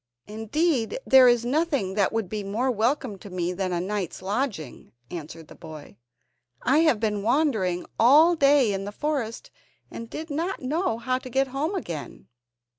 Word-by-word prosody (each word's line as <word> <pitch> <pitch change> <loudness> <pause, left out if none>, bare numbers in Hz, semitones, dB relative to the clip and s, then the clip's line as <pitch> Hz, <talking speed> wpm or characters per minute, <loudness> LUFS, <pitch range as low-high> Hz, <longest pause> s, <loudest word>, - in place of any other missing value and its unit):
"Indeed 230 - -1
there 260 -1 +7
is 240 -1 +3
nothing 280 - 0
that 200 -1 +1
would 225 -3 -2
be 210 +2 -4
more 225 +7 -1
welcome 235 -1 -1
to 200 - -11
me 180 -1 -2
than 185 0 -2
a 175 - -1
night's 185 -1 -4
lodging," 205 - -4 0.2
answered 165 -1 -8
the - - -13
boy; 155 -7 -11 0.7
"I 270 +5 +3
have 310 -9 +3
been 210 -2 -1
wandering 220 - 0
all 300 +9 +6
day 275 -7 +4
in 195 0 -3
the 205 - -5
forest, 260 -2 -3 0.4
and 230 0 -8
did 320 0 -7
not 335 +6 -2
know 305 0 -1
how 255 +2 -1
to 260 - -10
get 265 +2 0
home 295 +9 -2
again. 170 - -6
230 Hz, 170 wpm, -25 LUFS, 195-280 Hz, 0.7 s, there